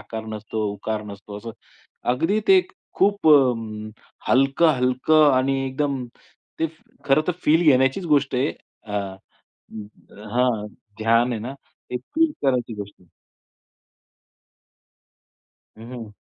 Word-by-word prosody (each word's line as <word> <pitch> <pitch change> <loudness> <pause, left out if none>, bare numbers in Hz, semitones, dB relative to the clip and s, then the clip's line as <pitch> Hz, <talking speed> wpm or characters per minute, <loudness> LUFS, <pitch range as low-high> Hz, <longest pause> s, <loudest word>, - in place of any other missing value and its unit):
आकार 110 -1 -7
नसतो, 110 0 -5
उकार 105 +1 -4
नसतो 100 0 -9
असं. 115 +2 -8 0.6
अगदी 185 +11 +1
ते 380 -1 +8 0.3
खूप 200 -2 +1
अ, 155 - +9 0.2
अम, 110 -2 -6 0.4
हलकं-हलकं 135 +1 +4
आणि 130 +1 +2
एकदम 135 -1 -2 0.6
ते 160 - +3 0.4
खरं 135 +2 +4
तर - - +3
फील 160 +3 +4
घेण्याचीच 135 +7 +2
गोष्ट 145 -4 +2
आहे. 130 +4 +1 0.3
अ, 105 - -9
अं, 105 +1 -9
हां. 120 -4 +1 0.3
ध्यान 115 +3 +3
आहे 115 - -2
ना 120 +5 -5 0.4
ते 125 - -2
फील 320 - 0
करायची 125 -4 0
गोष्ट 100 -1 -8
आहे. 90 - -24 2.7
हं, 115 +2 -11
हं. 115 -4 -8
125 Hz, 120 wpm, -23 LUFS, 110-140 Hz, 2.7 s, अ